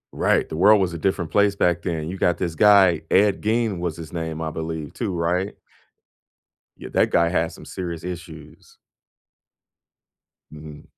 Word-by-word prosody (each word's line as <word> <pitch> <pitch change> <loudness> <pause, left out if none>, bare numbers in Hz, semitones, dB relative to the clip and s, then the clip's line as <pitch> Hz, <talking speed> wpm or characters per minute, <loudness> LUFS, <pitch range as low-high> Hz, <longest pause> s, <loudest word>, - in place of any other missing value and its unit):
Right. - - +1
The - - -6
world 100 +5 +5
was 90 -3 -1
a 85 - -6
different 90 -3 -1
place 100 +1 +3
back 85 -3 +1
then. 80 -3 -3
You 95 +3 -5
got 85 -2 +2
this 85 -2 -3
guy, 95 -2 +5
Ed 100 0 +3
Gein 110 -3 0
was 85 -2 -3
his 80 -2 -10
name, 80 -2 -4
I 80 -1 -3
believe, 80 -2 -5
too, 110 -5 -3
right? 90 +3 -1 1.2
Yeah, - - -9
that - - +2
guy 85 0 +3
had 85 -1 0
some - - -13
serious 85 -3 -6
issues. 85 -3 -10 1.7
Mhm. 75 -1 -11
85 Hz, 165 wpm, -22 LUFS, 80-95 Hz, 1.7 s, world